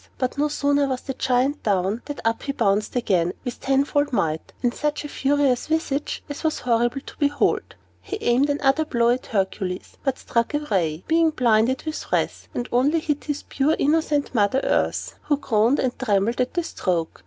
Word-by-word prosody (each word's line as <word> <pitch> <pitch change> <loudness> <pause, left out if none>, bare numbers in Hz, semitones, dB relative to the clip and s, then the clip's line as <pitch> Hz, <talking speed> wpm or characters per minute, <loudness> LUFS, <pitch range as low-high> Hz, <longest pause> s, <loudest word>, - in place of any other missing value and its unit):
But 255 -1 -1
no 290 +2 +1
sooner 285 -1 +1
was 260 -2 -2
the 270 - -5
Giant 260 +3 +1
down, 200 +2 0
than 290 - -6
up 225 0 +1
he 275 - -3
bounced 210 -2 +1
again, 180 -8 +1
with 245 - -5
tenfold 280 +2 +1
might, 160 -9 -1
and 240 -1 +2
such 300 0 -2
a - - -3
furious 275 -3 +1
visage 305 -3 -1
as 290 +2 -7
was 315 -1 +1
horrible 240 +2 +1
to - - -11
behold. 285 -1 +1 0.3
He 415 - -5
aimed 255 +1 +2
another 285 +1 +2
blow 235 -6 +1
at 250 +2 0
Hercules, 190 -3 -2
but 270 -2 0
struck 235 +5 -1
awry, 185 - -1
being 330 0 +4
blinded 245 -3 +2
with 310 0 -5
wrath, - - -1
and 245 - -2
only 280 +7 +3
hit 295 -2 -2
his 295 -1 -3
poor 285 +3 +1
innocent 295 -1 +1
Mother 220 +3 +2
Earth, - - 0
who 290 - +2
groaned 235 -1 +2
and 255 -1 -1
trembled 220 0 +1
at 250 - -2
the 345 - +1
stroke. 175 - -2
260 Hz, 185 wpm, -23 LUFS, 230-290 Hz, 0.3 s, being